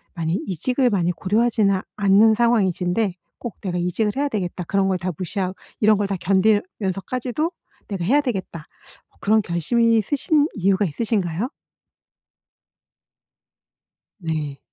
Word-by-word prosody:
많이 165 Hz, -1 st, -1 dB
이직을 250 Hz, -, +1 dB
많이 180 Hz, -5 st, +1 dB
고려하지는 210 Hz, +1 st, +1 dB, 0.2 s
않는 205 Hz, +2 st, +5 dB
상황이신데 200 Hz, -4 st, +1 dB, 0.2 s
꼭 240 Hz, -4 st, -7 dB
'내가 180 Hz, -3 st, -3 dB
이직을 180 Hz, +5 st, 0 dB
해야 285 Hz, +1 st, 0 dB
되겠다.' 185 Hz, -6 st, -3 dB
그런 195 Hz, +3 st, +1 dB
걸 190 Hz, -, +1 dB
다 180 Hz, +1 st, -3 dB
무시하 185 Hz, +2 st, -3 dB, 0.3 s
이런 215 Hz, -1 st, +4 dB
걸 205 Hz, 0 st, 0 dB
다 195 Hz, -, -2 dB
견디면서까지도 205 Hz, -, 0 dB, 0.4 s
'내가 195 Hz, -4 st, -4 dB
해야 270 Hz, +11 st, +3 dB
되겠다.' 190 Hz, -, -4 dB, 0.4 s
뭐 -, -, -32 dB
그런 215 Hz, +1 st, +3 dB
결심이 225 Hz, +7 st, +2 dB
서신 290 Hz, -, +1 dB
이유가 195 Hz, +1 st, +2 dB
있으신가요? 195 Hz, -, -1 dB, 2.7 s
네. 155 Hz, -5 st, -3 dB
200 Hz, 295 characters per minute, -22 LUFS, 180-230 Hz, 2.7 s, 않는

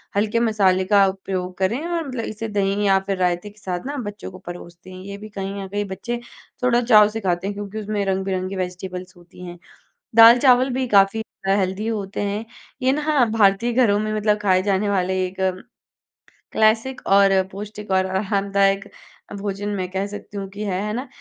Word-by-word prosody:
हल्के 215 Hz, +3 st, +1 dB
मसाले 200 Hz, -5 st, +2 dB
का 200 Hz, 0 st, +5 dB
उपयोग 190 Hz, -1 st, -4 dB
करें 230 Hz, -, -1 dB
और 335 Hz, -4 st, -2 dB
मतलब 250 Hz, -3 st, -4 dB
इसे 220 Hz, +1 st, -5 dB
दही 205 Hz, 0 st, 0 dB
या 195 Hz, -1 st, +4 dB
फिर 195 Hz, -1 st, -1 dB
रायते 180 Hz, +2 st, 0 dB
के 210 Hz, +1 st, -20 dB
साथ 185 Hz, +1 st, -4 dB
ना 285 Hz, +1 st, -4 dB
बच्चों 205 Hz, -5 st, -6 dB
को 185 Hz, -, -11 dB
परोसते 175 Hz, -1 st, -10 dB
हैं। 185 Hz, -, -10 dB
ये 200 Hz, 0 st, -7 dB
भी 215 Hz, +1 st, -10 dB
कहीं 195 Hz, -1 st, -5 dB
न 195 Hz, -, -6 dB
कहीं 205 Hz, +1 st, -3 dB
बच्चे 240 Hz, +5 st, -5 dB, 0.4 s
थोड़ा 245 Hz, -1 st, +3 dB
चाव 215 Hz, -3 st, +6 dB
से 225 Hz, +1 st, -5 dB
खाते 180 Hz, 0 st, -1 dB
हैं 205 Hz, -, -2 dB
क्योंकि 205 Hz, +1 st, -6 dB
उसमें 210 Hz, -1 st, -2 dB
रंग-बिरंगी 190 Hz, 0 st, -2 dB
वेजिटेबल्स 180 Hz, 0 st, -5 dB
होती 175 Hz, +1 st, -13 dB
हैं। 175 Hz, 0 st, -9 dB, 0.6 s
दाल-चावल 245 Hz, +3 st, +7 dB
भी 260 Hz, 0 st, -1 dB
काफ़ी 200 Hz, +1 st, +4 dB, 0.3 s
हेल्दी 195 Hz, +2 st, 0 dB
होते 205 Hz, -3 st, -3 dB
हैं 205 Hz, +2 st, -2 dB, 0.4 s
ये 260 Hz, +1 st, +3 dB
ना 295 Hz, -2 st, +2 dB
भारतीय 210 Hz, +3 st, +3 dB
घरों 225 Hz, -5 st, +3 dB
में 215 Hz, 0 st, -2 dB
मतलब 210 Hz, 0 st, +1 dB
खाए 185 Hz, -2 st, +3 dB
जाने 200 Hz, +1 st, +1 dB
वाले 190 Hz, -2 st, 0 dB
एक 185 Hz, +1 st, -7 dB, 1.2 s
क्लासिक 225 Hz, +4 st, +2 dB
और 195 Hz, 0 st, +5 dB, 0.2 s
पौष्टिक 210 Hz, 0 st, -8 dB
और 190 Hz, 0 st, +3 dB
आरामदायक 195 Hz, 0 st, 0 dB, 0.5 s
भोजन 205 Hz, 0 st, -3 dB
मैं 185 Hz, -1 st, -3 dB
कह 190 Hz, +1 st, -1 dB
सकती 205 Hz, 0 st, -9 dB
हूँ 195 Hz, -1 st, -4 dB
कि 205 Hz, +2 st, -7 dB
है, 190 Hz, -2 st, -2 dB
है 210 Hz, 0 st, -3 dB
ना? 255 Hz, +4 st, -4 dB
200 Hz, 185 wpm, -22 LUFS, 190-215 Hz, 1.2 s, दाल-चावल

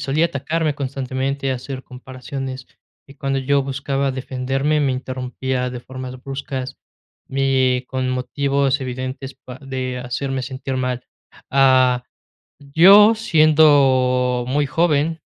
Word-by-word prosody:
solía 155 Hz, +5 st, +1 dB
atacarme 155 Hz, 0 st, -2 dB
constantemente, 135 Hz, 0 st, -3 dB
hacer 130 Hz, +1 st, -6 dB
comparaciones, 130 Hz, +1 st, -7 dB, 0.4 s
y 140 Hz, -, -15 dB
cuando 135 Hz, 0 st, -1 dB
yo 140 Hz, +1 st, +1 dB
buscaba 140 Hz, 0 st, -2 dB
defenderme 135 Hz, +3 st, -1 dB
me 135 Hz, -2 st, +1 dB
interrumpía 130 Hz, 0 st, -3 dB
de 125 Hz, -1 st, -6 dB
formas 130 Hz, 0 st, -8 dB
bruscas, 135 Hz, -1 st, -5 dB, 0.5 s
y 130 Hz, -2 st, +1 dB
con 130 Hz, -1 st, -2 dB
motivos 140 Hz, +2 st, 0 dB
evidentes 130 Hz, +1 st, -5 dB
pa 130 Hz, -1 st, -12 dB
de 130 Hz, -2 st, -4 dB
hacerme 130 Hz, +2 st, -3 dB
sentir 130 Hz, +1 st, -5 dB
mal. 125 Hz, -1 st, -2 dB, 0.5 s
Ah, 130 Hz, -2 st, +4 dB, 0.6 s
yo, 195 Hz, +10 st, +7 dB
siendo 140 Hz, -, +3 dB
muy 145 Hz, +3 st, +1 dB
joven, 160 Hz, +1 st, +1 dB
135 Hz, 115 wpm, -20 LUFS, 130-140 Hz, 0.6 s, yo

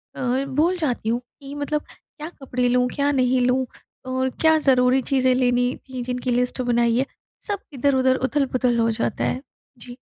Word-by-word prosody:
अ, 260 Hz, +2 st, -1 dB
भूल 345 Hz, +5 st, +2 dB
जाती 250 Hz, -8 st, -1 dB
हूँ, 240 Hz, +1 st, +1 dB, 0.2 s
कि 275 Hz, +1 st, -9 dB
मतलब 290 Hz, +1 st, -2 dB
क्या 305 Hz, +2 st, -11 dB
कपड़े 250 Hz, -5 st, -2 dB
लूँ? 250 Hz, 0 st, +3 dB
क्या 285 Hz, 0 st, +2 dB
नहीं 255 Hz, -1 st, +2 dB
लूँ? 255 Hz, +1 st, +1 dB, 0.4 s
और 260 Hz, 0 st, -1 dB
क्या 320 Hz, 0 st, +5 dB
ज़रूरी 260 Hz, -2 st, +3 dB
चीज़ें 260 Hz, -1 st, +2 dB
लेनी 245 Hz, 0 st, +1 dB
थी 255 Hz, -1 st, -5 dB
जिनकी 250 Hz, 0 st, -3 dB
लिस्ट 250 Hz, +1 st, 0 dB
बनाई 235 Hz, -1 st, +2 dB
है। 270 Hz, -, +1 dB, 0.4 s
सब 405 Hz, -2 st, -2 dB
इधर-उधर 260 Hz, -1 st, +2 dB
उथल-पुथल 255 Hz, -4 st, 0 dB
हो 230 Hz, 0 st, +2 dB
जाता 220 Hz, -, -2 dB
है। 255 Hz, -, -1 dB, 0.4 s
जी। 245 Hz, +1 st, -11 dB
255 Hz, 170 wpm, -23 LUFS, 245-275 Hz, 0.4 s, क्या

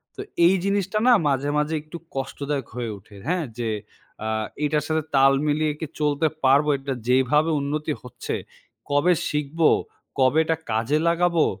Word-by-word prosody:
তো -, -, -6 dB, 0.2 s
এই 180 Hz, +3 st, +6 dB
জিনিসটা 200 Hz, +1 st, 0 dB
না 250 Hz, -, +8 dB
মাঝে, 140 Hz, 0 st, 0 dB
মাঝে 150 Hz, +2 st, 0 dB
একটু 155 Hz, +3 st, -9 dB, 0.2 s
কষ্টদায়ক 140 Hz, 0 st, -3 dB
হয়ে 120 Hz, -2 st, -3 dB
ওঠে, 100 Hz, +2 st, -17 dB
হ্যাঁ? 175 Hz, -1 st, 0 dB
যে 120 Hz, -2 st, -2 dB, 0.5 s
অ্যা 110 Hz, -, -2 dB, 0.4 s
এটার 150 Hz, 0 st, +1 dB
সাথে 160 Hz, 0 st, 0 dB
তাল 135 Hz, 0 st, +6 dB
মিলিয়ে 150 Hz, +1 st, +1 dB
কি -, -, -3 dB
চলতে 150 Hz, +1 st, +2 dB, 0.2 s
পারবো, 140 Hz, +3 st, +5 dB
এটা 135 Hz, 0 st, -4 dB
যেভাবে 130 Hz, +5 st, +3 dB
উন্নতি 150 Hz, +2 st, -2 dB
হচ্ছে, 125 Hz, -, -5 dB, 0.5 s
কবে 145 Hz, +5 st, +4 dB, 0.2 s
শিখবো, 150 Hz, +2 st, +2 dB, 0.5 s
কবে 130 Hz, +3 st, +4 dB
এটা 160 Hz, -, +1 dB, 0.2 s
কাজে 115 Hz, +7 st, +1 dB
লাগাবো। 170 Hz, -1 st, +3 dB
150 Hz, 155 wpm, -24 LUFS, 135-160 Hz, 0.5 s, না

